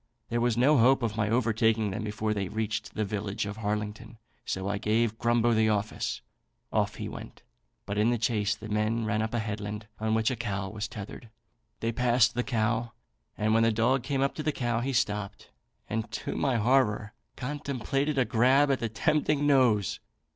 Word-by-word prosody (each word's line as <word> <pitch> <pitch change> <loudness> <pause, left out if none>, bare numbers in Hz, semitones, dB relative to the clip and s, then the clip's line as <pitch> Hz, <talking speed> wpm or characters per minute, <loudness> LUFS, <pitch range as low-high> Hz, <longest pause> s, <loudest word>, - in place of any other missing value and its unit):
There 120 0 0
was 120 -1 +1
no 135 +3 +5
hope 130 +2 +4
of 110 -2 -1
my 110 -1 0
overtaking 110 -2 +2
them 105 +3 -4
before 110 0 -1
they 100 -2 -2
reached 110 +1 -3
the 110 - 0
village 105 +1 -3
of 100 +1 -6
Harlington, 105 +2 -4 0.3
so 95 +1 -3
I 100 0 -1
gave 110 +1 +1
Grumbo 120 0 +3
the 110 0 +3
office. 105 0 -2 0.5
Off - - +1
he - - -5
went, - - -9 0.4
but 100 +1 -2
in 110 +2 +4
the 120 - +2
chase 105 -3 0
the 110 - -9
men 110 +2 0
ran 110 0 0
up 110 +2 -2
a - - +1
headland 105 -1 -4
on 110 0 0
which 110 +2 +2
a - - -1
cow 100 -4 -3
was 105 +1 -4
tethered. 105 +2 -9 0.5
They 115 - 0
passed 120 0 +3
the 125 - 0
cow; 115 -1 -1 0.4
and 110 +1 +1
when 115 - +4
the 115 0 +4
dog 120 +4 +2
came 135 +1 -1
up 140 - 0
to - - -5
the 155 - 0
cow 120 -4 -1
he 130 +3 -1
stopped, 105 -4 -2 0.4
and, 110 -1 -3
to - - -3
my 135 -3 +1
horror, 110 -3 +2 0.2
contemplated 140 +1 -2
a 130 - +3
grab 130 +5 +4
at 135 - +1
the 115 -1 -2
tempting 150 +4 +1
nose. 125 -9 +3
110 Hz, 195 wpm, -28 LUFS, 105-120 Hz, 0.5 s, no